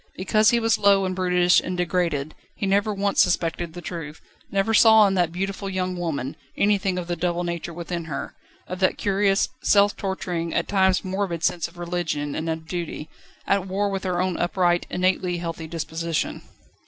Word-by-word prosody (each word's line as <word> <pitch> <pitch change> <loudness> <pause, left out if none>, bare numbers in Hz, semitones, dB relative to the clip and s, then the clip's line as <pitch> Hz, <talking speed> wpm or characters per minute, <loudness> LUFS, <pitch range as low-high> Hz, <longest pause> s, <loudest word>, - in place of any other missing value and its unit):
Because 215 +3 +3
he 235 - +3
was 225 -1 +2
low 200 -1 +4
and 185 0 -2
brutish 180 -1 +3
and 180 0 -4
degraded, 170 -4 -1 0.2
he - - -3
never 200 +2 +2
once 200 0 +2
suspected 170 -2 0
the 175 0 -9
truth, 160 -3 -6 0.3
never 200 +3 0
saw 220 -1 +7
in 195 - +2
that 175 -3 +1
beautiful 195 +2 -3
young 185 -1 -2
woman, 155 -6 -3 0.2
anything 200 -2 +2
of 180 - -3
the 175 0 -2
double 175 +1 -1
nature 170 0 -4
within 170 0 -5
her, 150 -4 -5 0.3
of 185 0 -5
that 185 - +2
curious, 195 0 +2
self 205 0 +4
torturing, 180 -4 -3
at - - 0
times 190 -1 +2
morbid 185 -3 -2
sense 170 -2 +1
of 170 +1 -18
religion 170 -4 -2
and 160 +1 -3
of 160 0 -4
duty, 170 -3 -5 0.4
at 195 -1 +1
war 200 +2 -1
with 195 -1 -3
her 180 -2 -1
own 185 -1 0
upright, 175 0 +1
innately 180 -1 0
healthy 165 -1 -5
disposition. 165 0 -3
180 Hz, 180 wpm, -24 LUFS, 170-195 Hz, 0.4 s, saw